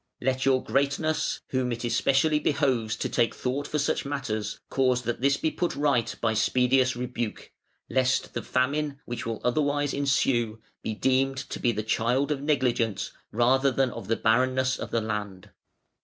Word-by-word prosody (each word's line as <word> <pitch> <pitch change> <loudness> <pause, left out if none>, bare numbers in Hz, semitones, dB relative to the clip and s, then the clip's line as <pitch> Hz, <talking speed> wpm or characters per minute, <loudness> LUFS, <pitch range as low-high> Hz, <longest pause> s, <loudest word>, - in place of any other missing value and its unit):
"Let 130 +1 0
your 130 -1 +3
Greatness, 140 +3 0
whom 130 -1 0
it 120 +1 -4
especially 135 +6 +2
behoves 130 -8 +1
to - - -2
take 120 -2 +1
thought 140 +3 -2
for 150 - -2
such 145 - 0
matters, 125 -7 -3
cause 130 -2 +1
that 120 +1 -3
this 140 +1 +3
be 160 - 0
put 175 - -2
right 140 -6 +1
by 115 -1 +1
speediest 125 +3 +2
rebuke: 120 -2 -4 0.4
lest 130 0 +1
the - - -2
famine, 140 +2 -1
which 120 0 -5
will 115 -2 -3
otherwise 145 +2 +1
ensue, 130 -5 +1 0.2
be 110 - -3
deemed 135 +3 +1
to 130 - -5
be 120 - +2
the 110 -1 -3
child 125 +6 +1
of 140 -2 -1
negligence 125 -8 0 0.2
rather 130 +4 +3
than 135 -1 +1
of 100 - -8
the 115 - +2
barrenness 130 +3 +2
of - - -5
the 115 - 0
land". 105 -3 -5
130 Hz, 170 wpm, -27 LUFS, 115-140 Hz, 0.4 s, your